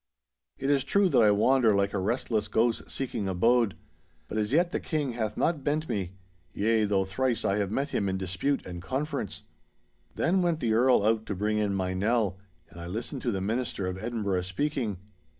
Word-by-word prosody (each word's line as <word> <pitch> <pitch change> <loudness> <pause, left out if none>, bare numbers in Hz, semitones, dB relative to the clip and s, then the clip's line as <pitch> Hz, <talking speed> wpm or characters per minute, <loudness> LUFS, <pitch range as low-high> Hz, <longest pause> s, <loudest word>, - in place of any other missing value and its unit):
It 135 +1 0
is 140 -2 +3
true 200 -2 +3
that - - +4
I 110 - +6
wander 110 +2 +4
like 100 0 +1
a 100 - 0
restless 110 +1 -1
ghost 115 +2 0
seeking 120 -6 -3
abode; 115 +3 +2 0.5
but 110 - -2
as 105 +1 -1
yet 170 +4 +3
the - - -1
King 150 -5 -2
hath 110 -3 -3
not 160 -4 0
bent 155 +2 0
me—yea, 95 +3 -2
though 100 -2 +1
thrice 115 +4 -1
I 100 - +2
have 100 -2 0
met 135 +7 -1
him 100 -7 0
in 95 - -1
dispute 95 +10 -1
and 90 -1 -7
conference.' 135 - -3 0.7
Then 185 +3 +2
went 170 -3 +1
the 115 -6 +1
Earl 120 -2 +4
out 110 0 +1
to 100 - -2
bring 105 +3 0
in 100 -2 0
my 95 -1 -1
Nell, 100 -1 0 0.3
and 85 +2 -10
I 85 - -6
listened 115 +8 -5
to 120 - 0
the 95 -3 -2
minister 110 -1 -2
of 90 0 -3
Edinburgh 105 -6 -1
speaking. 110 +3 -2
110 Hz, 195 wpm, -28 LUFS, 95-130 Hz, 0.7 s, I